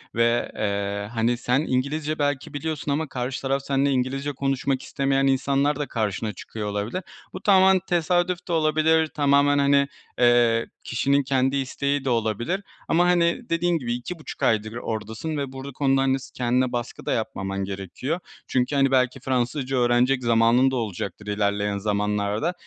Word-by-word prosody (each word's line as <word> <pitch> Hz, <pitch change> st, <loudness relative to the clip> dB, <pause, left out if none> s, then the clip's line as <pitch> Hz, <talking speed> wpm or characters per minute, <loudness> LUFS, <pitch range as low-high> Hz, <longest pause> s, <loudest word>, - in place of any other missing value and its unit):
ve, 115 Hz, +1 st, +2 dB
eee, 100 Hz, 0 st, -2 dB
hani, 120 Hz, +1 st, +1 dB
sen 125 Hz, +2 st, +1 dB
İngilizce 150 Hz, +2 st, -1 dB
belki 145 Hz, 0 st, -1 dB
biliyorsun 150 Hz, 0 st, -3 dB
ama 155 Hz, +3 st, -1 dB
karşı 125 Hz, +1 st, -3 dB
taraf 135 Hz, 0 st, 0 dB
seninle 140 Hz, 0 st, +2 dB
İngilizce 135 Hz, +2 st, -1 dB
konuşmak 135 Hz, 0 st, -1 dB
istemeyen 135 Hz, 0 st, 0 dB
insanlar 140 Hz, +2 st, +2 dB
da 145 Hz, -, -2 dB
karşına 110 Hz, -1 st, -2 dB
çıkıyor 105 Hz, +2 st, -6 dB
olabilir. 105 Hz, -, -3 dB, 0.3 s
Bu 185 Hz, -, -7 dB
tamamen 190 Hz, -2 st, +5 dB
tesadüf 175 Hz, +1 st, 0 dB
de 175 Hz, -, -2 dB
olabilir, 160 Hz, 0 st, +3 dB
tamamen, 145 Hz, -1 st, +3 dB
hani, 140 Hz, 0 st, +4 dB, 0.3 s
eee, 120 Hz, -1 st, +4 dB, 0.2 s
kişinin 140 Hz, +4 st, +1 dB
kendi 135 Hz, 0 st, +1 dB
isteği 140 Hz, +1 st, -1 dB
de -, -, +1 dB
olabilir 120 Hz, -, 0 dB, 0.3 s
ama, 175 Hz, +2 st, +3 dB
hani, 175 Hz, +6 st, +2 dB
dediğin 170 Hz, +1 st, +1 dB
gibi 120 Hz, -5 st, -3 dB
2,5 155 Hz, +7 st, -6 dB
aydır 110 Hz, 0 st, +1 dB
oradasın 110 Hz, +6 st, -4 dB
ve 140 Hz, -2 st, -3 dB
bur 135 Hz, 0 st, -8 dB
konu 135 Hz, 0 st, +2 dB
da, -, -, +2 dB
hani, 135 Hz, 0 st, +2 dB
s -, -, -12 dB
kendine 125 Hz, +1 st, +1 dB
baskı 120 Hz, -1 st, -5 dB
da -, -, -1 dB
yapmaman 95 Hz, -3 st, -2 dB
gerekiyor. 100 Hz, -, -4 dB, 0.3 s
Çünkü, 130 Hz, +3 st, 0 dB
hani, 135 Hz, -1 st, +3 dB
belki 130 Hz, 0 st, +2 dB
Fransızca 130 Hz, +1 st, -1 dB
öğrenecek 125 Hz, +1 st, +2 dB
zamanın 115 Hz, +3 st, +4 dB
da -, -, -2 dB
olacaktır 105 Hz, -2 st, -4 dB
ilerleyen 105 Hz, 0 st, 0 dB
zamanlarda 105 Hz, -, -1 dB
130 Hz, 160 wpm, -24 LUFS, 115-145 Hz, 0.3 s, tamamen